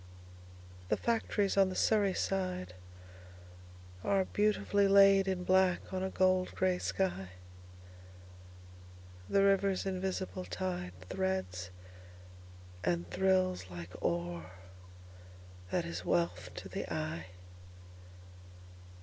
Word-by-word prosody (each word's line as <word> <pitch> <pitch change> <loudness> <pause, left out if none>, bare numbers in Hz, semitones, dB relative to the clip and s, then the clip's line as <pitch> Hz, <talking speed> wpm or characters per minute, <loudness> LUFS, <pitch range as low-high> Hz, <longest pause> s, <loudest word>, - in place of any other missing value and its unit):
The - - +2
factories 215 -4 0
on 195 -1 +5
the 185 - -5
Surrey 205 -2 +3
sideAre 185 - -2 1.6
beautifully 205 -1 +2
laid 195 0 +6
in 185 -1 -1
black 185 0 +2
on 185 - -1
a 190 - -1
gold 185 -1 +2
grey 185 -1 +1
sky. 180 - -1 2.0
The 195 - +4
river's 195 -1 +2
invisible 185 - -3
tideThreads 90 - -3 1.1
and 85 0 0
thrills 185 - +1
like 85 0 -8
ore 85 0 -2 1.2
that - - 0
is 85 +2 -5
wealth 90 +1 0
to - - -7
the - - -5
eye. 80 +3 -3
185 Hz, 90 wpm, -33 LUFS, -, 2.0 s, laid